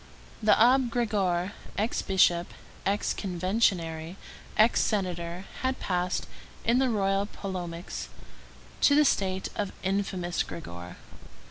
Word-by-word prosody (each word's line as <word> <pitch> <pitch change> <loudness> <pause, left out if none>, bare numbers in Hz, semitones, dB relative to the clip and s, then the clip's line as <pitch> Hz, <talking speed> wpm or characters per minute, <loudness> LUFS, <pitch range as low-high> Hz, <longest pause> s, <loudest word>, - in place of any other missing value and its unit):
The 215 -1 +5
Abbé 250 +2 +5
Grégoire, 200 -6 0 0.3
ex 215 +3 0
bishop, 175 -2 +2 0.3
ex 200 +2 +1
conventionary, 180 -3 0 0.4
ex 220 +2 +5
senator, 180 -3 -2 0.2
had 260 0 0
passed, 180 0 -1 0.4
in 235 +3 +4
the 265 -1 +3
royalist 200 -1 0
polemics, 180 -3 -5 0.7
to 285 - +6
the 300 0 +6
state 190 -7 +1
of 205 -2 -2
"Infamous 190 -2 -1
Grégoire." 90 - -7
195 Hz, 110 wpm, -28 LUFS, 175-215 Hz, 0.7 s, to